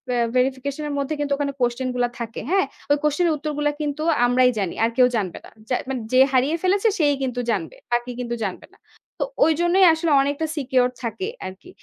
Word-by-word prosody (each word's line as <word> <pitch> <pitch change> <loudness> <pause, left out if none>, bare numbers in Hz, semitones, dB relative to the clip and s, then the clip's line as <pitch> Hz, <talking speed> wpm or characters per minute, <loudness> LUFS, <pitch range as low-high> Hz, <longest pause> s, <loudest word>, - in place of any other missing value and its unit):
আ - - +1 0.2
verification 265 +3 0
-এর 290 - -3
মধ্যে 280 +2 -2
কিন্তু 285 -1 0
ওখানে 280 0 -2
question 245 +1 0
গুলা 245 -1 +1
থাকে, 230 -1 -5
হ্যাঁ? 385 0 +3 0.3
ওই 290 - +5
question 300 +4 +2
-এর 320 - +2
উত্তরগুলো 295 0 -1
কিন্তু 295 0 -3 0.2
আমরাই 250 +1 +4
জানি 190 -4 -1
আর 225 - +3
কেউ 250 -1 +6
জানবে 190 -5 -3
না। - - -13 0.2
যা 250 - +2
মানে 260 -2 -2
যে 255 - +6
হারিয়ে 265 +5 +3
ফেলেছে 395 +4 +3
সেই 295 -3 +4
কিন্তু 250 -2 -2
জানবে। 185 -7 -3 0.2
আর 240 - +4
কেউ 250 -1 -6
কিন্তু 240 -1 -3
জানবে 190 -3 -4
না। - - -22 0.4
তো, - - +2 0.2
ওইজন্যই 345 +4 +4
আসলে 320 0 -1
অনেকটা 285 +3 -1
secure 255 -3 +2
থাকে 230 - -3 0.2
আরকি। 190 - -11
270 Hz, 210 wpm, -22 LUFS, 245-300 Hz, 0.4 s, কেউ